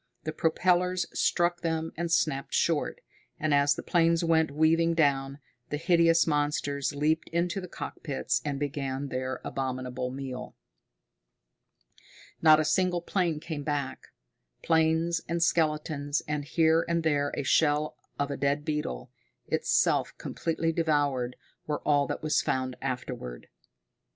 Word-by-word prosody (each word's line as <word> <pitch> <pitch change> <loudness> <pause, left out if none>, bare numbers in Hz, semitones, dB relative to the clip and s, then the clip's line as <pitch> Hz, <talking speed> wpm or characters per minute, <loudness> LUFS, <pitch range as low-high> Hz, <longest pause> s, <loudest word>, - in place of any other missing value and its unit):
The 155 - -4
propellers 180 +2 +1
struck 175 0 +1
them 160 -1 -1
and 170 0 -3
snapped 140 -5 +1
short, - - 0 0.4
and 155 -1 +1
as 140 0 +4
the - - -6
planes 170 -1 +2
went 160 -1 +3
weaving 165 +3 +2
down, 140 -3 +1 0.3
the 150 - -2
hideous 165 0 +4
monsters 145 -2 -1
leaped 155 +3 0
into 175 +3 -1
the 180 - -7
cockpits 145 -4 -3
and 140 -2 -3
began 140 -1 -3
their 130 0 -3
abominable 130 -1 -3
meal. 130 -1 -6 1.9
Not 155 -1 +7
a 155 - +1
single 175 +2 +1
plane 175 -5 0
came 160 -2 -5
back. 145 -2 -3 0.6
Planes 160 +1 +2
and 170 0 +1
skeletons, 150 -3 0
and 150 -1 -2
here 160 +1 +3
and 170 -1 +1
there 145 -2 +1
a - - -1
shell 150 +2 +2 0.2
of 145 0 -1
a 140 - -3
dead 140 +1 0
beetle, 150 - -3 0.3
itself - - +1
completely 165 0 -2
devoured, 145 -6 0 0.3
were 150 -1 -2
all 145 -1 +3
that - - -4
was 155 - +2
found 130 -1 -1
afterward. 125 - -5
150 Hz, 135 wpm, -28 LUFS, 140-165 Hz, 1.9 s, Not